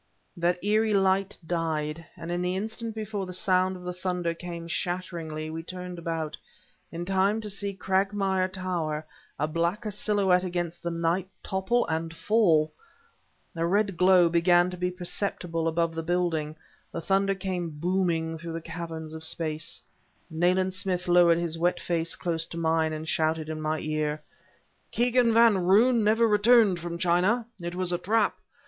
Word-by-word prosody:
That 175 0 0
eerie 215 +1 +2
light 195 0 +2
died, 160 -1 -2
and 165 0 -6
in 175 0 -1
the 180 +1 -1
instant 220 +3 -4
before 210 -3 -4
the 185 - -7
sound 185 -1 +2
of 180 - -10
the 180 0 -4
thunder 180 -2 -2
came 170 0 -7
shatteringly, 165 -3 -3
we 165 +1 -4
turned 180 +1 -7
about... 165 -2 -3 0.6
in 170 +1 -5
time 195 +3 +2
to 210 -1 -4
see 200 0 -3
Cragmire 190 0 0
Tower, 170 -5 -3 0.3
a 150 - 0
blacker 170 +7 -1
silhouette 195 -3 +2
against 175 -2 -3
the 170 - -2
night, 170 +2 -1
topple 195 +6 0
and 160 0 -3
fall! 170 -8 +3 0.8
A 165 - -1
red 200 +1 +1
glow 180 -1 +5
began 175 +1 +3
to - - -5
be 180 +1 0
perceptible 175 -2 -2
above 165 0 0
the 165 - -3
building. 165 -3 -1 0.4
The - - -4
thunder 195 +2 +1
came 185 -3 -3
booming 165 0 -1
through 165 +1 -6
the 165 - -3
caverns 160 -1 -6
of 160 0 -8
space. 160 0 -2 0.5
Nayland 180 +3 +2
Smith 185 -1 -2
lowered 175 -1 +5
his 170 -1 -2
wet 175 +2 +1
face 165 -1 -1
close 165 -2 -1
to 170 - -8
mine 160 -1 +1
and 155 0 -5
shouted 155 0 0
in 155 0 -4
my 155 +1 0
ear: 155 -1 -2 0.7
"Kegan 245 0 +3
Van 230 -3 +5
Roon 220 +6 +4
never 225 +2 +4
returned 210 -3 +5
from 170 0 -5
China. 185 +7 +2 0.2
It 175 +1 -4
was 180 -1 0
a 175 - 0
trap. 215 +3 +1
175 Hz, 165 wpm, -27 LUFS, 165-190 Hz, 0.8 s, glow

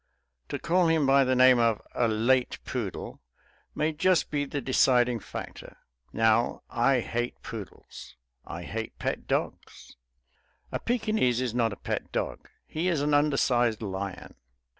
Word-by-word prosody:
To - - -2
call 175 +1 +2
him 160 -3 +3
by 135 0 +5
the 130 0 +1
name 130 -1 +6
of 115 -2 +2
a 120 - +2
late 120 +4 +1
poodle - - -5 0.5
may 155 +1 +1
just 180 +3 +1
be 145 -1 0
the 145 +1 -4
deciding 125 -2 +3
factor. - - -9 0.3
Now 115 +1 +2
I 125 +1 +2
hate 120 +2 -3
poodles; 95 - -9 0.3
I 85 +1 -7
hate 110 +4 -5
pet - - -3
dogs. - - -4 0.7
A - - -2
Pekinese 215 - +1
is 125 -3 -2
not 115 -2 +1
a - - -5
pet - - -4
dog; - - -4 0.2
he 165 +4 -3
is 170 -6 +1
an 145 0 +1
undersized 125 -6 +2
lion. 95 -1 -5
125 Hz, 145 wpm, -27 LUFS, 115-145 Hz, 0.7 s, name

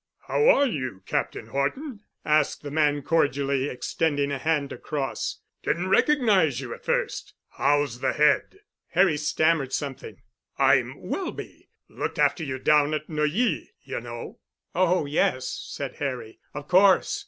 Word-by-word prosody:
"How 460 +2 +3
are 285 - +5
you, 130 - -4
Captain - - -2
Horton?" 210 - -3 0.3
asked 150 -1 +2
the 145 - -6
man 145 -2 +1
cordially, 140 -3 +1
extending 145 +2 -1
a 140 - -2
hand 150 -3 0
across. 140 -3 -4 0.2
"Didn't 175 +3 -1
recognize 200 - +3
you 125 -4 -6
at - - -12
first. - - -2
How's 145 -3 +1
the - - 0
head?" 150 - +2 0.3
Harry 185 -3 +4
stammered 150 -2 +1
something. 140 -3 -5 0.4
"I'm - - +3
Welby—looked - - -6
after - - +2
you 130 -3 -3
down 150 +2 +3
at 155 0 -6
Neuilly, 155 - 0
you - - -5
know." 120 0 -8 0.3
"Oh, 180 -2 +2
yes," 130 -3 0 0.2
said 140 -2 -6
Harry. 130 -6 -4 0.2
"Of 145 0 -6
course. 195 - +4
150 Hz, 135 wpm, -25 LUFS, 140-165 Hz, 0.4 s, are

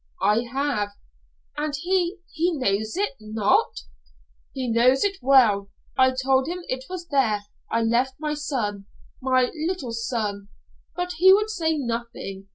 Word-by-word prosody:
"I 220 +3 +3
have." 265 -7 -1 0.6
"And 295 -1 -1
he 355 +4 0
he 340 0 0
knows 220 - 0
it? 410 +1 +1
Not?" 215 - +1 0.7
"He 260 -2 -4
knows 240 +3 +4
it 400 -1 0
well. 235 -7 +4 0.3
I 260 0 +4
told 265 +1 +2
him 355 +1 -4
it 255 0 -3
was 360 -2 -6
there 225 -8 +2 0.3
I 230 0 +1
left 245 +3 +1
my 300 -1 -2
son 215 -9 -3 0.3
my 255 -1 +2
little 310 -6 -3
son 215 -4 -3 0.5
but 355 0 -2
he 375 +2 +8
would 425 +2 +4
say 320 -6 0
nothing. 230 -6 -5
260 Hz, 145 wpm, -24 LUFS, 225-320 Hz, 0.7 s, he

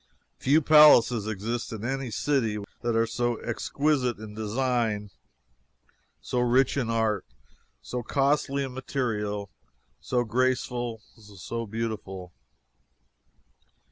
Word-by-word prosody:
Few 150 +4 +3
palaces 130 -8 +7
exist 110 +3 -3
in 110 0 -5
any 135 0 -2
city 115 -3 0 0.2
that 120 -1 0
are 115 0 +3
so 120 +1 -1
exquisite 130 +1 0
in 105 0 -9
design, 110 -1 -1 1.1
so 125 - -2
rich 125 +2 +3
in 125 -5 -1
art, 110 -3 +1 0.6
so 125 - -4
costly 140 +2 +1
in 130 -2 -5
material, 105 -7 -3 0.5
so 120 -1 0
graceful, 120 -1 -1
so 110 +2 -7
beautiful. 100 -5 -5
120 Hz, 105 wpm, -27 LUFS, 110-130 Hz, 1.1 s, palaces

